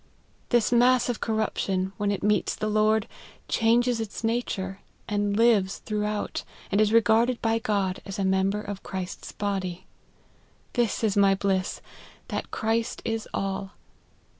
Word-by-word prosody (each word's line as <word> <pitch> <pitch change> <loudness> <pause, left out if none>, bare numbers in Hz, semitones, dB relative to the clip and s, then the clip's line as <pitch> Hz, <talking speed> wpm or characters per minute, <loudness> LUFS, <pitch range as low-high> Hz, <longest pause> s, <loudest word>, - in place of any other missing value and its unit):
This 240 -2 +3
mass 245 +1 +4
of 240 - -1
corruption, 195 -4 -1
when 205 -1 0
it 200 - -2
meets 210 0 +2
the 215 - -2
Lord, 215 0 +3 0.4
changes 235 +1 +2
its 220 +1 -6
nature, 200 -4 -2 0.3
and 205 -1 0
lives 220 -5 +3
throughout, 210 -1 -2 0.3
and 200 +2 +3
is 215 -1 +3
regarded 230 +2 +4
by 225 0 +1
God 200 -4 -1
as 195 - -6
a 195 - 0
member 190 +2 +1
of 200 -2 -6
Christ's 185 -2 -6
body. 185 -3 -3 0.9
This 235 -3 0
is 215 -3 +2
my 200 -1 +5
bliss, 190 -1 -1 0.5
that - - -3
Christ 225 +1 -1
is 225 -1 -2
all. 195 0 -3
210 Hz, 140 wpm, -26 LUFS, 195-225 Hz, 0.9 s, my